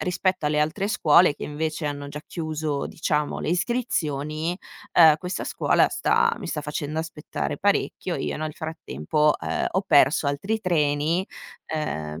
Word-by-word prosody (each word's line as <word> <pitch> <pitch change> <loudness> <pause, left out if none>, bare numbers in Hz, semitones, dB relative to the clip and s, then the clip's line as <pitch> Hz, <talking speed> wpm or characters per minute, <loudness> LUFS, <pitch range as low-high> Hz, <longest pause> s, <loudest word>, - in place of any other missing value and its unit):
rispetto 180 -3 0
alle 150 0 +1
altre 175 +7 0
scuole 170 -7 +5
che - - -11
invece 155 +1 -3
hanno 145 -1 -4
già 150 +1 -7
chiuso 155 -3 -3
diciamo 150 -2 -1
le - - -3
iscrizioni, 165 - -1 0.4
ehm, 160 -3 +7
questa 180 0 -4
scuola - - +2
sta - - +2
mi - - -7
sta 150 - -3
facendo 150 +1 -4
aspettare 150 -2 -5
parecchio. 195 -2 0
Io - - -3
nel 155 -1 -4
frattempo, 150 - 0
ehm, - - -2
ho 190 - +1
perso 145 0 +4
altri 195 +11 -2
treni, 160 +1 +1 0.4
ehm, 80 - -4
155 Hz, 150 wpm, -24 LUFS, 150-175 Hz, 0.4 s, ehm